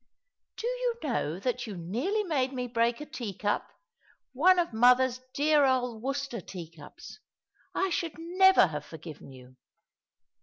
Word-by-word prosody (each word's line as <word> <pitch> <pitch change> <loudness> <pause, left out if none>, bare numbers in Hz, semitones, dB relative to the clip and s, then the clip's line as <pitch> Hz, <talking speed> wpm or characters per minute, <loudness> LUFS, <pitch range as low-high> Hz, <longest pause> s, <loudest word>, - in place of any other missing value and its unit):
" - - -60
Do - - -5
you - - -1
know 205 - -1
that 250 +2 -2
you 205 -4 -6
nearly 250 - -1
made 275 -8 0
me 250 -1 -3
break 235 +1 0
a - - -5
tea 240 - -6
cup 205 0 -1 0.3
— - - -35 0.3
one 360 +8 +5
of 340 -7 0
mother's 250 +2 +4
dear 300 0 +4
old 250 -4 +1
Worcester 275 -3 -3
tea 170 -3 -9
cups? 145 -2 -12 0.6
I 385 -1 0
should 330 -2 -2
never 370 - +5
have 150 -4 -4
forgiven 155 -2 -11
you." 130 -1 -15
250 Hz, 160 wpm, -29 LUFS, 205-315 Hz, 0.6 s, one